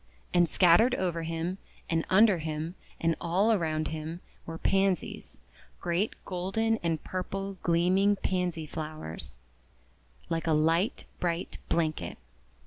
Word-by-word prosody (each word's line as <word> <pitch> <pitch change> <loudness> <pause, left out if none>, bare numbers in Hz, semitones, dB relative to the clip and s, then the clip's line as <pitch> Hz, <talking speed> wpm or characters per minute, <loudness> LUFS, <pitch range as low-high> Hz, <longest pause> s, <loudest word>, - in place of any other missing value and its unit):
And 175 -2 +4
scattered 185 +7 +5
over 175 -3 -1
him, 165 +3 -3 0.3
and 165 -1 0
under 195 -1 +6
him, 155 +1 -3 0.3
and 165 -1 +2
all 185 +6 +2
around 155 -6 0
him, 160 +2 -5 0.3
were 165 0 -5
Pansies 195 -1 0 0.2
— - - -27
great 175 +5 0
golden 195 +5 0
and 165 -5 -2
purple 195 +1 -4
gleaming 185 +4 +3
Pansy 180 -4 -1
flowers, 155 - -6 0.9
like 165 0 -2
a 160 - +4
light 165 +7 +2
bright 170 0 -2
blanket. 160 -2 0
170 Hz, 125 wpm, -29 LUFS, 160-190 Hz, 0.9 s, under